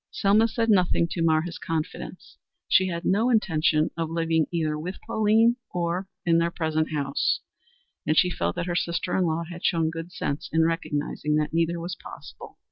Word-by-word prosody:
Selma 210 Hz, +3 st, +3 dB
said 230 Hz, 0 st, -1 dB
nothing 180 Hz, -3 st, +3 dB
to 170 Hz, -, -2 dB
mar 160 Hz, -1 st, +3 dB
his 175 Hz, 0 st, -6 dB
confidence. 170 Hz, +2 st, -5 dB, 0.3 s
She 190 Hz, 0 st, +4 dB
had 170 Hz, -1 st, -4 dB
no 220 Hz, +6 st, +2 dB
intention 160 Hz, -8 st, +2 dB
of 165 Hz, -1 st, -2 dB
living 165 Hz, -1 st, +1 dB
either 160 Hz, -3 st, 0 dB
with 175 Hz, +5 st, -5 dB
Pauline 225 Hz, +2 st, +3 dB
or 175 Hz, +2 st, -2 dB, 0.2 s
in 165 Hz, -1 st, +4 dB
their 170 Hz, 0 st, +1 dB
present 160 Hz, -2 st, -1 dB
house, 140 Hz, -2 st, 0 dB, 0.7 s
and 155 Hz, -, +2 dB
she 180 Hz, -, +4 dB
felt 85 Hz, -, -2 dB
that -, -, -2 dB
her 175 Hz, -1 st, -2 dB
sister 170 Hz, 0 st, -1 dB
in 185 Hz, -, +2 dB
law 165 Hz, 0 st, -1 dB
had 175 Hz, 0 st, -9 dB
shown 165 Hz, -2 st, +1 dB
good 165 Hz, +2 st, -7 dB
sense 145 Hz, -4 st, -4 dB
in 160 Hz, 0 st, +3 dB
recognizing 150 Hz, -2 st, -1 dB
that 150 Hz, 0 st, 0 dB
neither 170 Hz, +1 st, +1 dB
was 175 Hz, +2 st, -4 dB
possible. -, -, -11 dB
170 Hz, 185 wpm, -25 LUFS, 160-180 Hz, 0.7 s, She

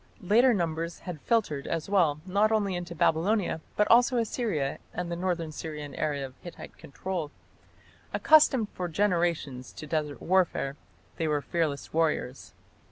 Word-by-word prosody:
Large 235 Hz, +5 st, +4 dB
numbers 165 Hz, -2 st, -2 dB
had 175 Hz, -5 st, -7 dB
filtered, 200 Hz, -12 st, 0 dB
as 165 Hz, -2 st, -2 dB
well, 170 Hz, -7 st, +2 dB
not 200 Hz, +3 st, +2 dB
only 205 Hz, -3 st, +1 dB
into 175 Hz, -1 st, -5 dB
Babylonia 170 Hz, +3 st, +1 dB
but 210 Hz, -, +3 dB
also 245 Hz, +2 st, +5 dB
Assyria 215 Hz, -, -1 dB, 0.2 s
and 175 Hz, -1 st, -3 dB
the -, -, -1 dB
north 170 Hz, -3 st, -2 dB
Syrian 150 Hz, -2 st, -6 dB
area 145 Hz, -3 st, -2 dB
of 130 Hz, -, -10 dB
Hittite 175 Hz, -, -10 dB
control. 170 Hz, +2 st, -5 dB, 0.8 s
Accustomed 285 Hz, -8 st, +5 dB
for 180 Hz, -, -4 dB
generations 170 Hz, -8 st, 0 dB
to -, -, -8 dB
desert 150 Hz, -1 st, -2 dB
warfare, 175 Hz, -6 st, +1 dB, 0.4 s
they 165 Hz, -, 0 dB
were 150 Hz, -1 st, +1 dB
fearless 160 Hz, -4 st, -2 dB
warriors. 155 Hz, -5 st, -1 dB
170 Hz, 145 wpm, -28 LUFS, 155-200 Hz, 0.8 s, also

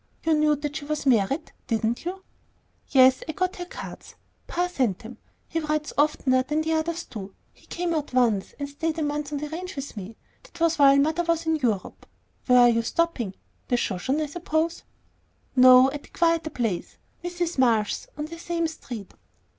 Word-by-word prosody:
You 320 Hz, -, +2 dB
knew 300 Hz, -1 st, +3 dB
that 295 Hz, +1 st, -4 dB
she 285 Hz, -, -7 dB
was 300 Hz, -1 st, -3 dB
married, 260 Hz, -, +2 dB, 0.2 s
didn't 225 Hz, +4 st, -1 dB
you?" 380 Hz, +2 st, -5 dB, 0.6 s
"Yes, 260 Hz, -1 st, +5 dB
I -, -, -1 dB
got 370 Hz, +3 st, -1 dB
her 355 Hz, -, -5 dB
cards. -, -, -9 dB, 0.3 s
Pa 355 Hz, +1 st, 0 dB
sent 255 Hz, -, 0 dB
them. 230 Hz, 0 st, -11 dB, 0.3 s
He 330 Hz, -, -2 dB
writes 305 Hz, -1 st, -2 dB
oftener 280 Hz, -3 st, +2 dB
than 300 Hz, +4 st, -1 dB
the 320 Hz, 0 st, 0 dB
others 335 Hz, +2 st, -1 dB
do; 230 Hz, -, -8 dB
and 195 Hz, 0 st, -8 dB, 0.2 s
he -, -, -24 dB
came 350 Hz, -1 st, -2 dB
out 305 Hz, -2 st, -2 dB
once 235 Hz, -6 st, +1 dB
and 285 Hz, -, -4 dB
stayed 315 Hz, +3 st, -3 dB
a 315 Hz, -, 0 dB
month 295 Hz, 0 st, -2 dB
on 295 Hz, -, -2 dB
the 300 Hz, +1 st, -4 dB
ranch 350 Hz, +3 st, -6 dB
with 275 Hz, -2 st, -6 dB
me. 210 Hz, +2 st, -8 dB, 0.2 s
That -, -, -16 dB
was 330 Hz, -1 st, +2 dB
while 275 Hz, -1 st, +7 dB
mother 315 Hz, +4 st, +2 dB
was 335 Hz, -1 st, 0 dB
in 320 Hz, 0 st, +2 dB
Europe. 225 Hz, -9 st, -2 dB, 0.4 s
Where 250 Hz, -1 st, +7 dB
are 245 Hz, -, +7 dB
you 230 Hz, -1 st, +2 dB
stopping? 240 Hz, -, -1 dB, 0.3 s
The 245 Hz, -, +2 dB
Shoshone, 240 Hz, +9 st, -1 dB
I -, -, -1 dB
suppose." 320 Hz, +1 st, -2 dB, 0.7 s
"No, 255 Hz, +1 st, +8 dB
at 290 Hz, 0 st, -8 dB
a -, -, -24 dB
quieter 330 Hz, -2 st, +1 dB
place, 225 Hz, -, -3 dB, 0.3 s
Mrs. 350 Hz, -3 st, -3 dB
Marsh's, 225 Hz, -5 st, +2 dB
on 300 Hz, -, -3 dB
the 335 Hz, +2 st, -9 dB
same 340 Hz, 0 st, -1 dB
street." 240 Hz, -10 st, -8 dB
295 Hz, 195 wpm, -25 LUFS, 250-330 Hz, 0.7 s, No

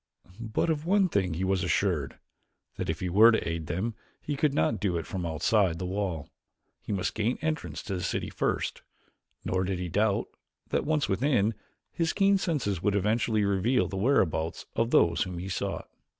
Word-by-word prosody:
But 115 Hz, +8 st, 0 dB
of 150 Hz, -1 st, -2 dB
one 190 Hz, +2 st, +3 dB
thing 95 Hz, -, 0 dB
he 90 Hz, -, -2 dB
was 95 Hz, 0 st, +1 dB
assured: 85 Hz, -6 st, 0 dB, 0.6 s
that -, -, -3 dB
if -, -, -2 dB
he 90 Hz, -, -1 dB
were 105 Hz, +6 st, +7 dB
to 110 Hz, -, 0 dB
aid 80 Hz, -1 st, -3 dB
them 95 Hz, +7 st, -2 dB, 0.3 s
he 145 Hz, -, -3 dB
could 145 Hz, +1 st, +2 dB
not 80 Hz, -, +1 dB
do 95 Hz, -4 st, 0 dB
it 80 Hz, -, -4 dB
from 90 Hz, -3 st, -4 dB
outside 85 Hz, +2 st, +2 dB
the 90 Hz, -, -4 dB
wall. 95 Hz, -4 st, -2 dB, 0.5 s
He -, -, -6 dB
must 95 Hz, -3 st, -1 dB
gain 110 Hz, +3 st, 0 dB
entrance 160 Hz, 0 st, -2 dB
to 100 Hz, -, -4 dB
the 90 Hz, -, -2 dB
city -, -, -2 dB
first, -, -, -1 dB, 0.6 s
nor 95 Hz, 0 st, 0 dB
did 95 Hz, 0 st, -1 dB
he 90 Hz, -1 st, -4 dB
doubt, 105 Hz, +3 st, +1 dB, 0.4 s
that -, -, 0 dB
once 150 Hz, -3 st, +1 dB
within, 110 Hz, 0 st, +2 dB, 0.4 s
his 165 Hz, -1 st, 0 dB
keen 200 Hz, -1 st, +3 dB
senses 120 Hz, -, -1 dB
would 105 Hz, +1 st, +1 dB
eventually 110 Hz, +1 st, +1 dB
reveal 100 Hz, +6 st, +2 dB
the -, -, -6 dB
whereabouts 95 Hz, -, +1 dB
of 115 Hz, 0 st, +1 dB
those 85 Hz, -8 st, +4 dB
whom 90 Hz, -1 st, -2 dB
he 90 Hz, +3 st, -5 dB
sought. 90 Hz, -, -3 dB
100 Hz, 190 wpm, -28 LUFS, 90-120 Hz, 0.6 s, were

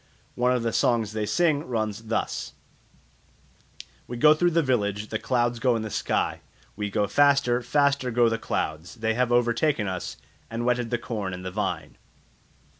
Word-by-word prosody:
One 125 Hz, +1 st, +1 dB
of 125 Hz, -2 st, +1 dB
the 115 Hz, -1 st, -1 dB
songs 115 Hz, -4 st, +2 dB
they 110 Hz, -1 st, -2 dB
sing 155 Hz, -2 st, +2 dB
runs 110 Hz, -2 st, -2 dB
thus: 110 Hz, -, -2 dB, 1.5 s
"We 120 Hz, -, -5 dB
go 150 Hz, +5 st, +7 dB
through 175 Hz, +3 st, +2 dB
the 165 Hz, -1 st, +2 dB
village; 105 Hz, -5 st, -1 dB
The 110 Hz, -, -2 dB
clouds 120 Hz, -2 st, 0 dB
go 125 Hz, 0 st, +2 dB
in 110 Hz, -, -2 dB
the 110 Hz, -, -5 dB
sky; -, -, -1 dB, 0.4 s
We 105 Hz, 0 st, -3 dB
go 105 Hz, +1 st, +1 dB
faster, 140 Hz, +1 st, +3 dB
Faster 140 Hz, +1 st, +1 dB
go 120 Hz, 0 st, +3 dB
the 115 Hz, 0 st, 0 dB
clouds; 80 Hz, -5 st, -3 dB
They 110 Hz, 0 st, 0 dB
have 125 Hz, +1 st, 0 dB
overtaken 120 Hz, 0 st, +2 dB
us, 90 Hz, -2 st, -4 dB, 0.3 s
And 115 Hz, +1 st, -3 dB
wetted 125 Hz, -1 st, +1 dB
the 120 Hz, -, 0 dB
corn 105 Hz, -6 st, -4 dB
and 90 Hz, +1 st, -9 dB
the 95 Hz, -, -4 dB
vine." 105 Hz, +3 st, -3 dB
120 Hz, 175 wpm, -26 LUFS, 110-125 Hz, 1.5 s, go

